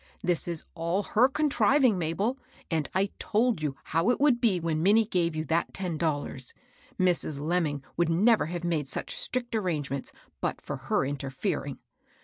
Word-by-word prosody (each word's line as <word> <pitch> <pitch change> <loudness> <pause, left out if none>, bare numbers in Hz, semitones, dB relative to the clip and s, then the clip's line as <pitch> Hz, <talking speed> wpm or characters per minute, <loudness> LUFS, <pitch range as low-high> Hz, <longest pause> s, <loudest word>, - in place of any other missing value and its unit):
This 175 -1 0
is 170 -2 -3
all 170 +4 -1
her 245 +6 +3
contriving, 265 -4 +3
Mabel; 190 +10 -1 0.3
and 160 -3 0
I 195 +1 +2
told 225 -4 +1
you 145 -3 -1
how 165 +7 +1
it 245 - +2
would 275 -4 +4
be 210 -7 +3
when 160 -2 -1
Minnie 210 +5 +5
gave 170 -5 0
you 155 0 -2
that 165 +3 0
ten 175 -5 -3
dollars. 145 -5 -2 0.4
Mrs. 175 -5 +1
Lemming 150 -3 0
would 170 -1 +2
never 210 +4 +4
have 175 +1 -4
made 160 -5 0
such - - -2
strict 245 -2 -2
arrangements 150 -10 -2 0.3
but - - -1
for - - -5
her - - 0
interfering. 135 -1 -3
175 Hz, 165 wpm, -28 LUFS, 155-215 Hz, 0.4 s, Minnie